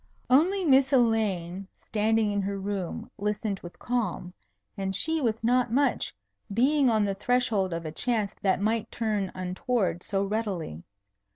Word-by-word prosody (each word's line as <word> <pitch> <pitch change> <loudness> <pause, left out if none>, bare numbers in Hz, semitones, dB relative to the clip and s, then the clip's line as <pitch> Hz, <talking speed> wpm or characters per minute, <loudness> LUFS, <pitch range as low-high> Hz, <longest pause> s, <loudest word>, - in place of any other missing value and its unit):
Only 360 +8 +4
Miss 270 -2 +5
Elaine 200 -7 +1 0.2
standing 220 0 +1
in 205 0 0
her 200 +1 -2
room 195 -3 -4
listened 210 -1 -1
with 175 - -11
calm; 230 -7 -2 0.4
and 190 -1 -2
she 320 - 0
with 225 -3 0
not 245 0 +2
much, 270 +1 +1 0.4
being 265 +5 +3
on 215 -2 +3
the 200 - 0
threshold 210 -3 +1
of 165 0 -4
a 155 - -4
chance 215 +2 -1
that 190 -2 +2
might 220 +2 0
turn 210 -4 -1
untoward 185 0 -1
so 195 0 -1
readily. 195 - -3
210 Hz, 150 wpm, -27 LUFS, 195-245 Hz, 0.4 s, Miss